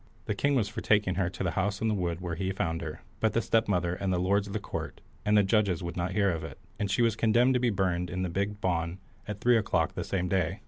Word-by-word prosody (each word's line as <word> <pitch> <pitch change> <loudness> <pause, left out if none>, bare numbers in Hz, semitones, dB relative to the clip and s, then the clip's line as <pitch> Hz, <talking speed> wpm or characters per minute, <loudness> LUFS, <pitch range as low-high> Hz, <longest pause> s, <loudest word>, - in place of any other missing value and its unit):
The - - -1
king 140 +7 +1
was 115 -6 +2
for 115 +2 -5
taking 105 -3 +3
her 90 -1 0
to 95 - -5
the 90 - 0
house 100 +3 -1
in 110 - 0
the 110 - +2
wood 90 -3 -2
where 85 -2 -3
he 95 +3 -2
found 85 -3 -2
her, 80 -1 -6 0.2
but 110 - +1
the - - +3
stepmother, 90 -6 +1
and 95 +1 -2
the 90 - +1
lords 100 +3 +1
of 100 - -7
the 110 - -1
court, - - -5 0.2
and 105 0 +3
the 105 - +6
judges 95 -4 +2
would 85 -1 -4
not 90 +1 -2
hear 100 -1 +3
of 80 -2 -3
it, - - -7 0.2
and 100 - -1
she 100 +5 +2
was 115 -3 +2
condemned 120 +4 +3
to 125 - +2
be 125 -1 +2
burned 90 -4 0
in 90 +1 -2
the - - 0
big 100 +4 -2
bawn 85 -2 -1 0.3
at 105 -1 -5
three 120 +1 +4
o'clock 105 - 0
the - - -3
same 90 -2 -1
day. 95 0 0
95 Hz, 280 wpm, -29 LUFS, 90-105 Hz, 0.3 s, the